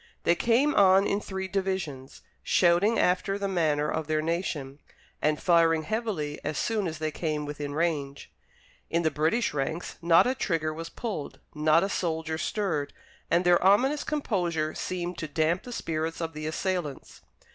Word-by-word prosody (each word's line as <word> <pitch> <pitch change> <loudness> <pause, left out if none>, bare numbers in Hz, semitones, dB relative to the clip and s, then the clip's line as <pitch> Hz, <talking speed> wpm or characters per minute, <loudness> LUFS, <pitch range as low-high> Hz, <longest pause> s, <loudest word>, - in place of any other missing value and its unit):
They 170 - +4
came 240 - +2
on 195 -2 +5
in 200 +1 0
three 190 -1 -4
divisions, 185 -9 -3 0.2
shouting 185 +6 +3
after 185 +2 +1
the 200 0 -2
manner 155 -5 +1
of 155 0 -2
their 155 0 +1
nation, 155 -4 -3 0.4
and 150 0 +1
firing 165 -2 +3
heavily 200 -9 -3
as 150 0 -3
soon 215 -4 0
as 160 -1 -4
they 155 0 -2
came 150 -1 -2
within 145 -1 -5
range. 150 -4 -2 0.6
In 170 +1 +1
the 160 - +2
British 165 +10 +1
ranks 150 +4 -3
not 165 0 +5
a 255 - +2
trigger 165 -10 -1
was 165 +1 -6
pulled, 210 -11 -5
not 155 +2 +3
a - - +1
soldier 160 -4 -2
stirred, 165 -10 -2 0.4
and 175 +2 +2
their 175 0 +4
ominous 260 +10 +4
composure 175 - -1
seemed 180 -1 -4
to 155 - -3
damp 160 +4 +1
the 245 - -10
spirits 165 -6 -3
of 165 -1 -3
the 155 0 -5
assailants. 170 -3 -3
165 Hz, 165 wpm, -27 LUFS, 155-190 Hz, 0.6 s, on